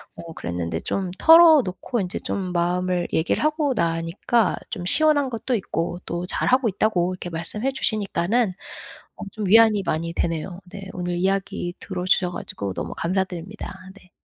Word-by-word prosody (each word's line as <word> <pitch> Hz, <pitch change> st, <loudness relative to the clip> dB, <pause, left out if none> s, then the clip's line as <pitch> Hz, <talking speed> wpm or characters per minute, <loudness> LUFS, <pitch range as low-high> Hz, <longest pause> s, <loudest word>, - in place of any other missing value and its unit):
어 165 Hz, -1 st, -9 dB
그랬는데 85 Hz, -, -4 dB
좀 190 Hz, -2 st, -2 dB
털어놓고 305 Hz, -, +5 dB
인제 180 Hz, -1 st, -4 dB
좀 185 Hz, -2 st, -3 dB
마음을 180 Hz, +1 st, 0 dB
얘기를 160 Hz, -, +1 dB
하고 305 Hz, -2 st, +1 dB
나니까 170 Hz, +5 st, 0 dB
좀 180 Hz, -6 st, -5 dB
시원한 290 Hz, -, +3 dB
것도 245 Hz, +1 st, -2 dB
있고 175 Hz, -3 st, -3 dB
또 175 Hz, +1 st, -3 dB
잘하고 255 Hz, +4 st, +2 dB
있다고 185 Hz, -3 st, 0 dB
이렇게 180 Hz, -1 st, -6 dB
말씀해 190 Hz, +10 st, -3 dB
주시니까는 215 Hz, -2 st, 0 dB, 0.7 s
어 -, -, -11 dB
좀 215 Hz, -2 st, -4 dB
위안이 215 Hz, -1 st, +6 dB
많이 165 Hz, +1 st, -2 dB
되네요. 170 Hz, +3 st, -3 dB
네. 195 Hz, -1 st, -8 dB
오늘 175 Hz, -1 st, -3 dB
이야기 190 Hz, -1 st, -1 dB
들어주셔 180 Hz, -1 st, 0 dB
가지고 100 Hz, -, -5 dB
너무 -, -, -5 dB
감사드립니다. 185 Hz, +2 st, -3 dB, 0.2 s
네. 185 Hz, -3 st, -19 dB
185 Hz, 345 characters per minute, -23 LUFS, 175-220 Hz, 0.7 s, 위안이